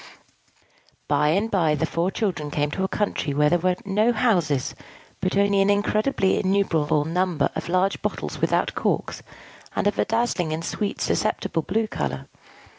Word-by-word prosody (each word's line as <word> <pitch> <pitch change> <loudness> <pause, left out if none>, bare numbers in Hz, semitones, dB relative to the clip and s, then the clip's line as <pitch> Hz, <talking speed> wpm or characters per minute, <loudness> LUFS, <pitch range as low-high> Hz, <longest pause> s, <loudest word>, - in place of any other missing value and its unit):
By 145 +1 +2
and 200 +9 +1
by 165 -6 +2
the 155 +2 0
four 170 +3 -1
children 175 -8 -2
came 145 0 -1
to 190 - -2
a - - +1
country 190 -8 -2
where 150 +1 +3
there 175 - +3
were 180 +1 +1
no 210 +4 +2
houses, 175 - +1 0.5
but 185 +1 -1
only 200 0 +3
an 195 - +3
incredibly 205 0 +1
innumerable 165 -6 +1
number 170 -2 0
of - - -4
large 185 +2 +1
bottles - - -4
without - - +1
corks, - - -1 0.5
and - - 0
of 205 -1 +1
a - - +3
dazzling 220 -8 0
and 165 +1 -4
sweetly 205 +3 -3
susceptible 210 -5 0
blue 220 +7 0
color. 215 - -4
185 Hz, 165 wpm, -24 LUFS, 155-205 Hz, 0.5 s, where